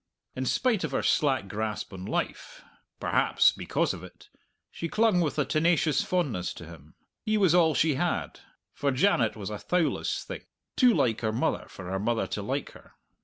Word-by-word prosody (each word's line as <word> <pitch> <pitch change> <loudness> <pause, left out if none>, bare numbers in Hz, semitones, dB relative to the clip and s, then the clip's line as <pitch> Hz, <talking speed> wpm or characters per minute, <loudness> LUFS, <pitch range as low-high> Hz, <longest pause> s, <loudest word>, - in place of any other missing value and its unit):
In 130 0 -2
spite 230 - +1
of 150 -4 -3
her - - 0
slack 135 -9 +2
grasp 105 +1 -4
on 95 0 -7
life - - -4 0.4
perhaps, - - +3
because - - -1
of - - -9
it - - -14 0.4
she 165 - -5
clung 215 -3 +3
with 155 -3 -1
a 150 - +2
tenacious 155 -1 +2
fondness 140 - -1
to 85 - -9
him. 80 -2 -14 0.3
He 215 0 +1
was 190 -5 +4
all 165 -4 +4
she 155 +4 +3
had, 175 +6 -2 0.3
for 140 - -1
Janet 130 - +2
was 105 -1 -6
a 105 - -5
thowless 175 -3 0
thing, - - -7 0.3
too 250 -3 +5
like 115 -3 +1
her 110 -2 0
mother 110 - -1
for 95 - -10
her 95 - -1
mother 115 +3 0
to - - -4
like - - -3
her. - - -17
140 Hz, 185 wpm, -28 LUFS, 110-175 Hz, 0.4 s, too